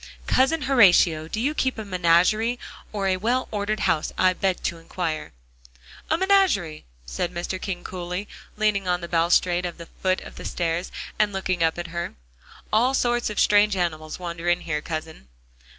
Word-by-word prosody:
"Cousin 290 Hz, +4 st, +2 dB
Horatio, 180 Hz, -, +5 dB
do 215 Hz, -, -4 dB
you 280 Hz, +6 st, +1 dB
keep 260 Hz, -5 st, 0 dB
a 220 Hz, -, -5 dB
menagerie, 185 Hz, +6 st, +3 dB, 0.3 s
or 205 Hz, -2 st, -2 dB
a 190 Hz, -1 st, +2 dB
well 240 Hz, +6 st, 0 dB
ordered 210 Hz, 0 st, -2 dB
house, 155 Hz, -, +1 dB
I 185 Hz, 0 st, +4 dB
beg 190 Hz, 0 st, -1 dB
to 170 Hz, -, -2 dB
inquire?" 165 Hz, -2 st, -4 dB, 0.8 s
"A 320 Hz, -, +2 dB
menagerie," 365 Hz, -, +2 dB, 0.2 s
said 60 Hz, -, -3 dB
Mr. 180 Hz, +1 st, -4 dB
King 180 Hz, -3 st, -4 dB
coolly, 180 Hz, +2 st, -5 dB, 0.3 s
leaning 210 Hz, -3 st, +1 dB
on 180 Hz, 0 st, +1 dB
the 170 Hz, -, -5 dB
balustrade 175 Hz, +1 st, +2 dB
at 175 Hz, -1 st, -4 dB
the 170 Hz, -, -9 dB, 0.2 s
foot 185 Hz, 0 st, +2 dB
of -, -, -11 dB
the -, -, -8 dB
stairs, 170 Hz, +1 st, -2 dB, 0.3 s
and 210 Hz, -1 st, +3 dB
looking 185 Hz, -2 st, -2 dB
up 165 Hz, 0 st, +2 dB
at 175 Hz, -1 st, -5 dB
her. 170 Hz, 0 st, -4 dB, 0.6 s
"All 245 Hz, +5 st, +3 dB
sorts 240 Hz, -2 st, +1 dB
of 210 Hz, -, -3 dB
strange 205 Hz, 0 st, +4 dB
animals 155 Hz, -4 st, -2 dB
wander 175 Hz, -1 st, -4 dB
in 175 Hz, 0 st, +2 dB
here, 150 Hz, -3 st, -2 dB
Cousin." 155 Hz, -, -6 dB
185 Hz, 175 wpm, -24 LUFS, 170-215 Hz, 0.8 s, Horatio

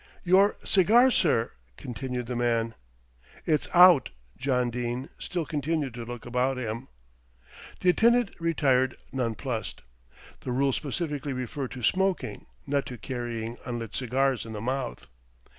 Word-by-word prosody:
"Your 195 Hz, +3 st, +4 dB
cigar, 230 Hz, +7 st, +5 dB
sir," 140 Hz, -, +2 dB, 0.3 s
continued 125 Hz, 0 st, -4 dB
the 125 Hz, +1 st, -4 dB
man. 115 Hz, -1 st, 0 dB, 0.7 s
"It's 155 Hz, -2 st, +1 dB
out." 180 Hz, -4 st, +7 dB, 0.3 s
John 125 Hz, -2 st, 0 dB
Dene 125 Hz, +2 st, -3 dB
still 175 Hz, -3 st, -3 dB
continued 150 Hz, -3 st, -2 dB
to 120 Hz, -1 st, -6 dB
look 120 Hz, 0 st, -8 dB
about 125 Hz, +2 st, 0 dB
him. 115 Hz, +1 st, -4 dB, 0.9 s
The 180 Hz, -, +5 dB
attendant 235 Hz, +2 st, +3 dB
retired 135 Hz, -6 st, +2 dB
nonplussed. 115 Hz, -, -3 dB, 0.6 s
The 125 Hz, -, -5 dB
rule 135 Hz, +2 st, +2 dB
specifically 145 Hz, -1 st, -3 dB
referred 130 Hz, +1 st, -4 dB
to 125 Hz, -2 st, -8 dB
smoking, 190 Hz, -, 0 dB, 0.2 s
not 140 Hz, 0 st, 0 dB
to 125 Hz, -, -7 dB
carrying 120 Hz, -1 st, -4 dB
unlit 120 Hz, -3 st, -5 dB
cigars 130 Hz, 0 st, 0 dB
in 115 Hz, -, -8 dB
the 105 Hz, -, -5 dB
mouth. 130 Hz, +2 st, -3 dB
130 Hz, 130 wpm, -27 LUFS, 120-155 Hz, 0.9 s, out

